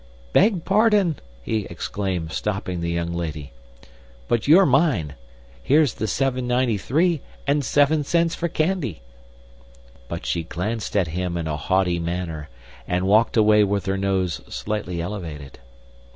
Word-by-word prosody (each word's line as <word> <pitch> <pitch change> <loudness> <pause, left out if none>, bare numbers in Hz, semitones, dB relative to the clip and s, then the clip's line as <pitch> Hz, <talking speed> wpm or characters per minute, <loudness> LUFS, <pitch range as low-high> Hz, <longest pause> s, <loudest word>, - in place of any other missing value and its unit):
"Beg 195 -4 +3
pardon!" 205 - +3 0.3
he 110 - -2
exclaimed, 90 -2 -3
stopping 95 -3 -3
the 85 - -2
young 85 0 -2
lady; 75 -5 -4 0.8
"but 115 +1 0
you're 180 +6 +7
mine. 130 - +2 0.5
Here's 145 - +3
the 110 - -3
seven 130 +3 0
ninety 125 -4 +1
three, 160 - +1 0.2
and 145 +1 +1
seven 145 +2 +3
cents 165 +3 +1
for 170 - -2
candy." 155 - -1 1.0
But - - -6
she 70 +8 0
glanced 105 +7 -3
at 90 -5 +1
him 90 +1 -2
in 85 - -3
a 75 -1 -2
haughty 90 +2 +1
manner, 85 -3 -4 0.4
and 90 +1 0
walked 110 +4 +3
away 105 -1 +5
with 100 0 0
her 95 0 0
nose 95 -3 -1
slightly 105 -5 -3
elevated. 85 -7 -6
100 Hz, 140 wpm, -23 LUFS, 85-140 Hz, 1.0 s, you're